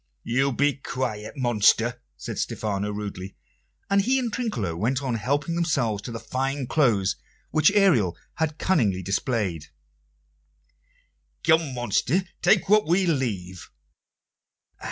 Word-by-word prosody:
"You 135 +4 +1
be 145 +2 +1
quiet, 125 -3 -4
monster," 120 0 +2 0.2
said - - -6
Stephano 105 -1 -2
rudely; 100 -2 -6 0.5
and 200 0 +3
he 255 +6 +2
and 240 -4 -2
Trinculo 160 - -2
went 125 +10 -1
on 130 -3 -1
helping 145 +8 -1
themselves 140 - 0
to 120 - -7
the 115 - -5
fine 135 +4 -2
clothes 115 -10 +2 0.3
which 155 +4 +4
Ariel 160 - +3 0.2
had 160 -1 -1
cunningly 110 - +1
displayed. 100 - -1 1.8
"Come, 160 -4 +3
monster, 125 - +1 0.2
take 215 - +4
what 210 -1 +4
we 180 +3 +3
leave." 105 - -2
125 Hz, 120 wpm, -25 LUFS, 105-160 Hz, 1.8 s, which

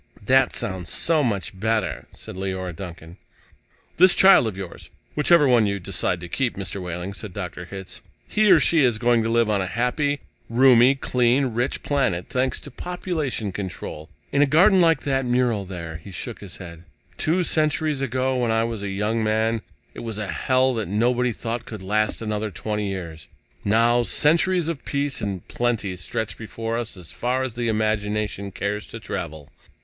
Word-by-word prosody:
"That 130 +2 +4
sounds 95 -3 -3
so 160 -3 +2
much 100 -5 -2
better," 110 +1 -1
said - - -10
Leora 95 -2 -4
Duncan. 85 -1 -9 0.8
"This 185 +1 +6
child 190 -11 +7
of 100 -4 -4
yours 95 -3 -8 0.2
whichever 150 0 +5
one 120 -4 +4
you 100 0 -1
decide 90 -1 -1
to 85 - -6
keep, 125 +6 -1
Mr. 100 0 -4
Wehling," 90 +2 -5
said 100 -2 -6
Dr. 90 -2 -6
Hitz. 95 +1 -8 0.3
"He 215 0 +3
or 180 -4 +8
she 155 0 +4
is 120 -4 +3
going 120 0 +3
to 110 - -1
live 115 0 +3
on 105 -2 +1
a 95 - -2
happy, 130 - 0 0.3
roomy, 125 +1 +6
clean, 125 -1 +1
rich 120 +4 -1
planet, 95 -12 0
thanks 130 +1 0
to - - -10
population 160 - -3
control. 90 -5 -6 0.2
In 140 - +2
a 145 - +5
garden 185 +7 +5
like 165 -3 +4
that 135 -1 +1
mural 120 -4 +1
there." 85 -4 -6
He 85 - -12
shook 110 +5 -6
his 95 -4 -9
head. 85 -3 -10 0.4
"Two 175 +4 +2
centuries 155 -3 +1
ago, 130 0 0
when 120 -2 0
I 110 0 +2
was 115 -2 -3
a 100 - -3
young 105 +3 -1
man, 110 +1 +1 0.3
it - - -9
was 115 -3 -5
a 105 - -2
hell 130 0 +2
that 110 -5 -2
nobody 120 +5 +1
thought 115 +1 -4
could 110 -4 -8
last 110 +3 0
another 105 0 -2
twenty 105 +2 -3
years. 85 -5 -6 0.4
Now 115 +3 +3
centuries 170 +7 +3
of 165 -5 -3
peace 140 -2 -1
and 95 -4 -4
plenty 115 -6 -1
stretch 105 +5 -4
before 115 +1 -4
us 115 -4 -4
as 90 -3 -8
far 125 +2 -1
as 130 -3 -3
the 120 0 -2
imagination 105 -2 -1
cares 105 +2 -3
to - - -8
travel." 75 -2 -6
115 Hz, 180 wpm, -23 LUFS, 100-130 Hz, 0.8 s, or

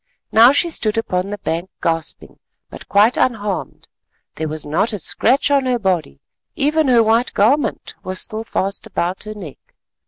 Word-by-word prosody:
Now 230 +3 +7
she 335 +4 +2
stood 215 -7 0
upon 185 -4 -1
the 205 - -4
bank 170 0 -3
gasping 165 -1 -3 0.3
but - - -12
quite 210 +4 +4
unharmed; 210 -6 -2 0.5
there 160 - -4
was 155 0 -5
not 170 +10 0
a - - -2
scratch 265 - +1
on 275 -2 +2
her 250 -1 +1
body; 180 - -2 0.4
even 305 +1 +1
her 240 -3 +5
white 225 +3 +1
garment 265 +8 +1
was 185 0 -3
still 215 +1 -3
fast 195 -3 -3
about 180 +4 -3
her 215 0 -7
neck. 175 -9 -9
210 Hz, 165 wpm, -19 LUFS, 180-245 Hz, 0.5 s, Now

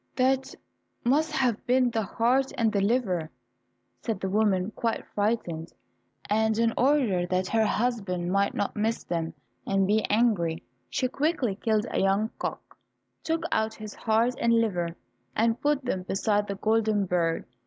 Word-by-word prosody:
"That 265 +1 +1 0.5
must 300 +6 +2
have 255 -7 0
been 250 0 +3
the 225 -1 0
heart 245 +6 +1
and 225 -2 +2
the 200 -2 +1
liver," 195 -7 0 0.7
said 225 -5 -2
the 190 0 -3
woman, 205 -2 +2
quite 230 0 -2
frightened, 205 -6 -1 0.6
and 220 +1 +2
in 230 0 +2
order 245 -10 +2
that 185 +1 0
her 220 -1 +2
husband 195 -6 -1
might 200 +1 +1
not 200 - -2
miss 220 +2 -1
them 165 -2 -3 0.3
and 195 0 +2
be 210 +2 +2
angry, 200 -8 +1 0.3
she 255 - 0
quickly 275 - 0
killed 215 +2 0
a - - 0
young 195 +3 +2
cock, - - -5 0.5
took 325 0 -1
out 220 0 0
his 215 -1 -8
heart 230 +2 +1
and 235 - +3
liver, 180 -7 +1 0.4
and 225 +1 +1
put 290 -2 +1
them 190 -7 -1
beside 205 +3 0
the 200 - -3
golden 215 0 +1
bird. 170 -2 0
220 Hz, 155 wpm, -27 LUFS, 195-235 Hz, 0.7 s, been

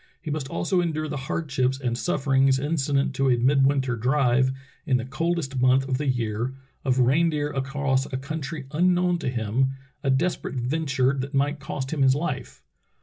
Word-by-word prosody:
He 155 - -5
must 145 -3 -3
also 180 +5 0
endure 155 -2 -2
the 145 - -4
hardships 135 -4 0
and 125 -3 -1
sufferings 135 -2 +2
in 145 +4 -2
cident 140 -2 +1
to 135 0 +1
a 125 - +4
midwinter 135 0 +2
drive, 130 +1 +2 0.4
in 130 -3 +3
the 120 - -4
coldest 155 -2 -2
month 130 +1 +4
of 130 -1 -1
the 145 - -2
year, 120 0 -1 0.3
of 130 -2 +1
reindeer 145 +3 +2
across 135 -1 -1
a 130 - -1
country 140 +1 -5
unknown 180 +2 +2
to 155 - -2
him 125 +3 0
— - - -39
a 135 - 0
desperate 135 0 0
venture 135 0 0
that 135 +2 -4
might 145 +2 +1
cost 135 +1 -4
him 150 - -1
his 135 0 +5
life. 140 -5 -4
135 Hz, 180 wpm, -25 LUFS, 130-150 Hz, 0.4 s, his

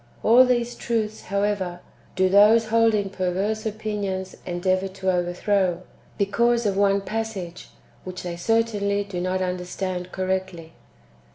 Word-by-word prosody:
^ - - -30 0.2
All 245 +3 +7
these 240 -1 0
truths, 220 -2 -3
however, 200 -3 -1 0.4
do 185 0 +3
those 215 +4 +5
holding 220 -3 +2
perverse 195 +4 -1
opinions 205 -3 -4
endeavour 185 +2 0
to 190 0 -2
overthrow, 180 0 0 0.3
because 235 +4 +2
of 200 -2 +1
one 200 0 +3
passage, 195 -4 -5 0.3
which 185 -1 -7
they 175 -1 -4
certainly 205 0 0
do 195 -3 -5
not 185 +1 -1
understand 180 0 -4
correctly. 185 -3 -3
195 Hz, 125 wpm, -24 LUFS, 185-215 Hz, 0.4 s, All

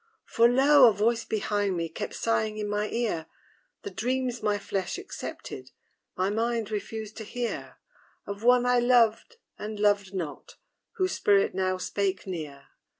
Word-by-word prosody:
For, 235 +1 +4
lo! 270 0 +7
a - - 0
voice 225 +4 +1
behind 205 -3 -1
me 165 0 -1
Kept 160 - -6
sighing 220 -1 0
in 210 -1 -3
my 210 +1 -1
ear 215 -9 -2 0.6
The 405 - -6
dreams 250 -1 -2
my 210 -1 +1
flesh 195 - -3
accepted, 385 +1 -7 0.5
My 185 +2 +1
mind 225 0 -1
refused 215 0 -5
to 220 - -5
hear 240 +2 -5 0.5
Of 200 0 -6
one 245 0 +5
I 250 0 +4
loved 240 - +3 0.2
and 210 0 -5
loved 205 -2 +2
not, 170 -7 -6 0.4
Whose 375 -4 0
spirit 200 -1 +3
now 185 0 0
spake 190 +1 -2
near. 155 -7 -7
215 Hz, 150 wpm, -27 LUFS, 195-240 Hz, 0.6 s, lo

